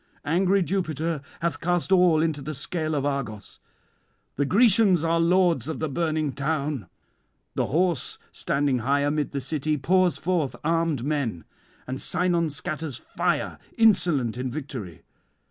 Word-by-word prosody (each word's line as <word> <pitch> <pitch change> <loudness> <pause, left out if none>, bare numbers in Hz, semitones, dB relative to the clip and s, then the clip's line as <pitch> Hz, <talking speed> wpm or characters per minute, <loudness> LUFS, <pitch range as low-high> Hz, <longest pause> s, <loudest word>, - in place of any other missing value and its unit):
Angry 185 +5 +2
Jupiter 165 -4 -2 0.2
hath 170 0 -1
cast 175 +1 0
all 180 -4 +5
into 155 -3 -1
the 155 +2 -5
scale 155 +2 -2
of 140 -1 -1
Argos. 120 -8 -4 0.8
The 140 - +1
Grecians 200 - +4
are 165 0 +2
lords 170 -6 +3
of 160 - -3
the 160 - -2
burning 155 -1 -1
[328 140 - -2
362]town. - - -36 0.6
The - - 0
horse, 170 -2 0
standing 140 -3 0
high 140 +5 +1
amid 145 0 0
the 140 - -2
city, 150 +3 -1
pours 180 +5 +2
forth 165 -5 -1
armed 165 -4 0
men, 135 - -2 0.4
and 130 +1 -5
Sinon 175 -2 +1
scatters 155 -2 -4
fire, - - -2 0.2
insolent 170 - +3
in 130 0 -2
victory. 125 - -7
155 Hz, 145 wpm, -25 LUFS, 140-175 Hz, 0.8 s, all